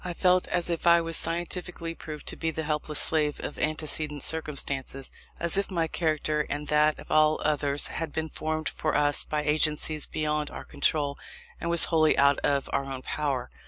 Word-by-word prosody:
I 180 -1 -5
felt 180 0 +3
as 175 -1 0
if 170 0 -2
I 170 0 +7
was 165 0 -2
scientifically 175 0 0
proved 155 -2 -9
to - - -5
be 165 - -2
the 160 0 -3
helpless 150 0 -2
slave 150 -2 +2
of - - -6
antecedent 155 -2 0
circumstances; 140 -4 -1 0.3
as 170 +3 +2
if 200 - -2
my 170 -4 0
character 155 -2 0
and 145 +1 -4
that 150 0 +3
of - - -12
all 155 0 +4
others 145 -1 +2
had 160 -1 -4
been 160 +1 -3
formed 155 +1 -3
for - - -2
us 145 -1 +2
by 150 -1 -2
agencies 155 0 0
beyond 150 -1 -1
our - - -8
control, 145 -1 0 0.4
and 170 - -3
was 170 -1 +5
wholly 155 -1 +4
out 140 0 +4
of 140 -1 0
our 140 - 0
own 135 -1 -6
power. 140 -5 -2
155 Hz, 190 wpm, -27 LUFS, 150-165 Hz, 0.4 s, I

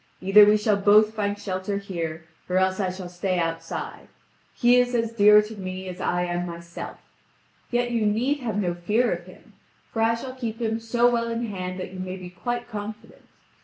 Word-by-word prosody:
Either 200 +2 +7
we 210 +1 +5
shall 210 -1 +2
both 210 +2 +5
find 205 -2 -1
shelter 195 0 -3
here 170 -5 -5 0.2
or 180 - +1
else 190 +1 +2
I 190 -2 +1
shall 185 0 -6
stay 180 +1 -2
outside; 165 -1 -4 0.5
he 245 +1 +5
is 245 0 +2
as 230 -1 0
dear 210 -1 +7
to 215 +1 -8
me 185 -1 -6
as 180 +1 -7
I 175 0 0
am 175 0 -2
myself. 170 0 -8 0.7
Yet 240 0 0
you 225 -3 +1
need 250 +8 +1
have 230 -5 -3
no 180 -4 0
fear 210 +8 +1
of 175 +1 -7
him! 185 - -16 0.4
For 225 - -1
I 225 +1 +3
shall 255 +2 -7
keep 235 -3 -5
him 225 -1 -1
so 235 +1 +2
well 235 -1 +1
in 230 +1 -2
hand 185 -3 -5
that 185 - -5
you 185 - -8
may 185 0 -5
be 180 -1 -9
quite 240 +6 -4
confident." 215 -1 -8
205 Hz, 200 wpm, -25 LUFS, 185-230 Hz, 0.7 s, Either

